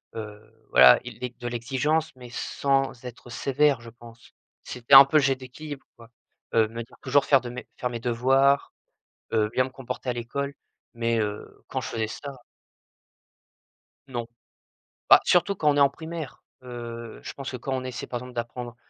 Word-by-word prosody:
heu, 110 0 -10
voilà. 65 -1 +8
Ils - - -8
di 125 -1 -4
de 120 - -5
l'exigence 135 +7 -1
mais 125 -1 -11
sans 135 0 -1
être 120 0 -10
sévère, 135 +2 +1
je 115 0 -11
pense. 115 0 -16 0.3
C'était 125 +2 -3
un 135 0 +12
peu 140 - -5
le 150 - +4
jeu 135 0 +3
d'équilibre 135 +3 -9
quoi, 115 -1 -16 0.4
heu, 110 -1 +4
me 115 +2 -6
dire 115 - -19
toujours 140 +2 +3
faire 140 - +5
de 125 -1 -7
mes 125 +1 -8
faire 125 - -2
mes 120 -1 -6
devoirs, 135 +4 +2 0.6
heu, 110 -2 +2
bien 130 - +2
me 130 - -7
comporter 130 -1 -7
à - - +2
l'école, 140 +4 -4 0.4
mais 115 0 0
heu, 105 -1 -5
quand - - -3
je - - -6
faisais 110 -1 -2
ça 140 +6 -7 1.8
Non. 120 -3 -4 0.8
Bah, - - +10
surtout 185 +3 +3
quand 150 -4 +2
on 145 - +2
est - - +4
en 140 -1 +6
primaire, 160 -2 -8 0.2
heu, 120 -2 -8
je - - -6
pense 135 -1 -6
que 130 - -5
quand 135 +2 -4
on 130 -1 -2
essaie 130 -1 -6
par, 120 - -4
exemple, 125 +1 -10
d'apprendre, 120 0 -5
125 Hz, 185 wpm, -26 LUFS, 115-135 Hz, 1.8 s, un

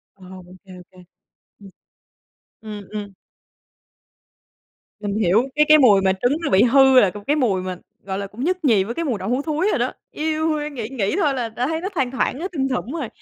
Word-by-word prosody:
Ờ, 190 -2 -16
OK, 180 +1 -15 0.2
OK. 180 0 -17 0.5
Ừ. 200 - -15 1.0
Ừm, 215 -2 -8
ừm. 205 -2 -6 1.9
Mình 205 -1 -3
hiểu, 210 +3 +3
cái 300 0 +4
cái 310 - +8
mùi 215 -9 +5
mà 190 - +2
trứng 245 +10 0
nó 330 - -2
bị 190 +1 +5
hư 265 +1 +6
là 200 -6 +3 0.2
cái 290 - +2
mùi 225 -11 +1
mà, 185 -1 -5 0.3
gọi 190 0 -4
là, 200 - -4
cũng 215 +6 -8
nhất 365 0 -1
nhì 215 -7 +4
với 225 +5 -5
cái 335 - -2
mùi 245 -8 -2
đậu 190 +4 -4
hú 255 +3 0
thúi 315 +5 -1
rồi - - 0
đó. - - -1 0.2
Eo 315 +1 -1
ôi, 300 -1 -2
nghĩ 240 -7 -6
nghĩ 240 - -2
thôi 310 -8 +1
là 245 -3 -3
đã 240 +4 -3
thấy 320 +1 -2
nó 385 - -3
thoang 270 -8 -1
thoảng, 260 0 -1
nó 355 - -3
thum 270 -4 -1
thủng 255 -1 -3
rồi. 305 -7 -3
245 Hz, 220 wpm, -21 LUFS, 200-300 Hz, 1.9 s, cái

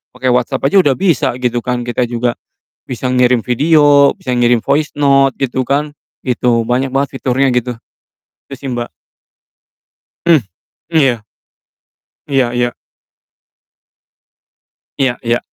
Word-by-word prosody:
pake 130 0 0
WhatsApp 130 +2 -1
aja 190 +8 +4
udah 140 -6 +1
bisa 170 -9 +1
gitu 120 -1 -1
kan, 125 -1 -3
kita 120 0 -1
juga 120 0 -1 0.5
bisa 125 0 -4
ngirim 125 -1 +3
video, 145 +3 +4
bisa 125 -1 -3
ngirim 120 -1 +3
voice 145 +4 0
note, 135 -1 +4
gitu 130 -1 -1
kan, 145 +3 -2 0.3
gitu, 120 -2 +1
banyak 130 +2 0
banget 135 +1 0
fiturnya 135 +1 +1
gitu. 125 0 -1 0.7
Itu 135 - -8
sih, 135 0 -7
Mbak. 120 -1 -3 1.4
Hmm, 170 -2 +5 0.5
iya. 135 -9 +2 1.0
Iya 135 -4 +1
iya. 120 0 -1 2.2
Iya 130 -3 +1
iya. 120 0 +1
130 Hz, 125 wpm, -15 LUFS, 120-140 Hz, 2.2 s, Hmm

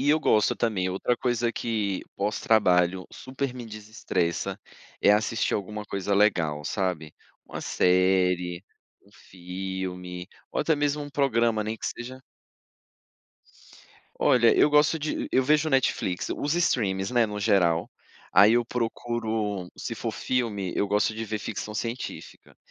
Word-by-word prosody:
E 140 +2 +3
eu 155 +1 +3
gosto 105 -7 +3
também, 100 -6 0
outra 100 +6 0
coisa 120 -1 0
que 105 -5 -2
pós 105 +2 -1
trabalho 95 -6 +3
super 130 0 -5
me 125 -2 -7
desestressa, 105 -5 -3 0.4
é - - +5
assistir 105 +2 +1
alguma 105 +1 -4
coisa 100 -1 -2
legal, 85 -8 +2
sabe. 90 -4 -2 0.3
Uma - - -7
série, 90 -1 +2 0.4
um 100 - -23
filme, 90 -1 -6 0.2
ou - - 0
até 160 - +2
mesmo 145 0 0
um 145 - -8
programa, 115 -6 +1
nem 110 +1 -3
que - - -10
seja 130 +2 -6 2.0
Olha, 125 -5 +4
eu - - +5
gosto 150 +2 +4
de 155 0 -3
eu 130 - +4
vejo 150 +3 +3
Netflix, 130 - 0
os 145 +2 -1
streamings, 100 - +1
né, 120 -2 +3
no 105 -1 -5
geral, 90 -5 +2 0.4
aí 100 +4 +7
eu 120 0 +3
procuro, 115 -5 -2
se - - -5
for - - -4
filme, 105 -8 -2
eu 100 - +1
gosto 105 +2 +1
de 115 +1 -4
ver 110 0 -3
ficção 105 +1 -5
científica, 115 +3 -6
105 Hz, 145 wpm, -26 LUFS, 95-120 Hz, 2.0 s, aí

